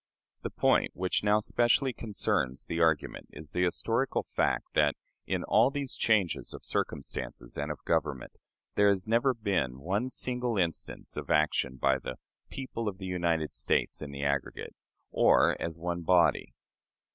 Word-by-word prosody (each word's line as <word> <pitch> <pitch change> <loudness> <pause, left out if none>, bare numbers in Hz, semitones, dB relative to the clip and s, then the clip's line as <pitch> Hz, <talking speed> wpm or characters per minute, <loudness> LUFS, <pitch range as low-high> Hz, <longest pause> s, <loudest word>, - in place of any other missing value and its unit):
The - - -3
point - - +2
which 90 +2 0
now 105 +1 +4
specially 120 +4 +2
concerns 70 - -1
the 85 - -3
argument 80 -3 +1
is 80 -1 -8
the 90 - +1
historical 90 - 0
fact - - -1
that, - - +3 0.3
in - - -1
all - - +4
these 140 -2 -4
changes 105 -7 +1
of - - -11
circumstances - - -4
and 75 +1 -2
of 75 - -8
government, 70 -4 -1 0.4
there 100 0 +4
has 95 -2 +1
never 120 +4 +2
been 95 - -1
one 100 - -1
single 125 -3 -2
instance 85 -3 -3
of - - -5
action 70 -3 +2
by 65 +1 +2
the 65 - -6 0.3
"people 125 -4 -5
of 100 -2 -3
the 95 - -7
United 85 -4 0
States - - 0
in 75 - -6
the 70 0 -6
aggregate," 70 -1 -2 0.4
or - - +4
as 85 -1 -3
one 85 +1 -3
body. 85 0 +3
90 Hz, 160 wpm, -30 LUFS, 75-110 Hz, 0.4 s, now